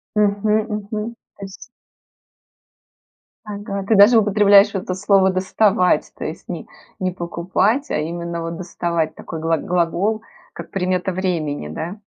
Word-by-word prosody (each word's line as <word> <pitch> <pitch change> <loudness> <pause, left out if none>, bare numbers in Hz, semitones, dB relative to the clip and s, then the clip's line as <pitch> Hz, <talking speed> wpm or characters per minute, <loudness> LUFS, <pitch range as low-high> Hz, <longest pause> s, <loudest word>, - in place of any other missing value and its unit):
Мгм. 205 0 +1 0.2
Мгм. 210 +2 -4 0.2
То - - -16
есть. 195 +5 -12 1.8
Ага, 200 -1 -5
ты 220 - +3
даже 210 +4 +8
употребляешь 205 -1 +5
вот 195 -2 -2
это 185 - -3
слово 195 0 +3
доставать, 185 0 +2
то - - -6
есть - - -6
не - - -6 0.3
не 185 -1 -1
покупать, 185 +9 -1
а - - +1
именно, 170 +2 -4
вот, 165 0 -4
доставать, 170 -2 -2
такой 160 - -7
глаг 165 0 0
глагол, 180 +5 0 0.3
как - - -9
примета 185 0 -1
времени, 170 - -2
да? 170 - -6
190 Hz, 140 wpm, -20 LUFS, 170-205 Hz, 1.8 s, даже